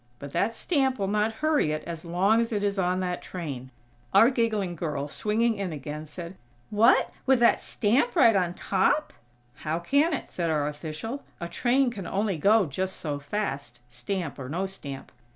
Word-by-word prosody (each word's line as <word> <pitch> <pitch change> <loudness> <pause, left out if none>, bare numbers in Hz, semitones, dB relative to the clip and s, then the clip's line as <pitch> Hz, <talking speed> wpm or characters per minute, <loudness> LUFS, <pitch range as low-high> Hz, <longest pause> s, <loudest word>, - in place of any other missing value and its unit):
But 140 +2 -8
that 225 +3 +1
stamp 270 -5 +1
will 195 -2 -1
not 210 +2 +1
hurry 300 - +3
it 155 0 -3
as 165 -2 -6
long 190 +6 +2
as 230 - -2
it 205 -2 -1
is 200 -1 0
on 180 0 +1
that 180 -1 -2
train." 140 -8 -6 0.5
Our 235 +4 +7
giggling 215 -7 0
girl, 150 -4 -3
swinging 220 +8 +1
in 200 -4 -3
again, 150 +1 -6
said: 170 +4 -8 0.3
"What? 225 +4 +4 0.2
With 265 -1 +5
that 235 - +5
stamp 240 +3 +1
right 230 -5 +6
on 180 -2 +1
top?" 200 +11 +1 0.4
"How 155 +1 -2
can 280 - +2
it?" 310 - -3
said 170 -2 -2
our 150 -2 +1
official. 155 - -5 0.2
"A 170 - -4
train 255 +6 +2
can 200 -5 -6
only 195 -4 -1
go 205 +4 +5
just 185 +6 -3
so 145 -3 -4
fast, 140 - -4
stamp 145 +7 -4
or 130 -1 -6
no 180 +6 -1
stamp." 145 -8 -8
190 Hz, 185 wpm, -27 LUFS, 155-225 Hz, 0.5 s, Our